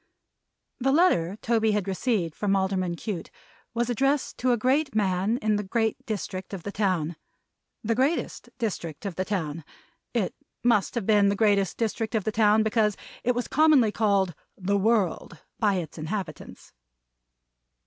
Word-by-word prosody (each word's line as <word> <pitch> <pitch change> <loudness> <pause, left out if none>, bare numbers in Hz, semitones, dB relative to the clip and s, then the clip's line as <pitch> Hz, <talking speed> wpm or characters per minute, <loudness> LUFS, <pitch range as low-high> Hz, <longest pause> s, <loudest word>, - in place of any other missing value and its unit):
The 270 +1 +2
letter 210 - +3
Toby 225 -2 +2
had 205 -2 -1
received 190 -4 0
from 200 +2 0
Alderman 190 -2 0
Cute, 180 -2 -5 0.5
was 235 0 +1
addressed 270 +4 0
to 255 0 +2
a 240 - +3
great 265 +4 +1
man 195 +2 +1
in 215 -1 +2
the 210 - -2
great 220 +2 -1
district 195 -3 -4
of 180 - -9
the 205 - -4
town. 180 -6 0 0.7
The 225 +1 +1
greatest 270 +8 -1
district 175 -7 -4
of 195 - -2
the 185 +3 -2
town. 165 -6 -3 0.5
It - - -1 0.3
must 235 -3 +2
have 235 -5 -1
been 205 -2 +4
the 200 - +1
greatest 200 -4 +2
district 225 0 -2
of 215 - +1
the 220 - -1
town, 215 0 +4
because 215 -1 +1 0.3
it 250 0 +1
was 245 - -2
commonly 295 -7 +4
called 200 -5 +1 0.2
"the 195 +1 0
world" 200 -5 +1 0.2
by 205 -3 +3
its 165 -3 -5
inhabitants. 185 +5 -6
210 Hz, 160 wpm, -26 LUFS, 190-230 Hz, 0.7 s, been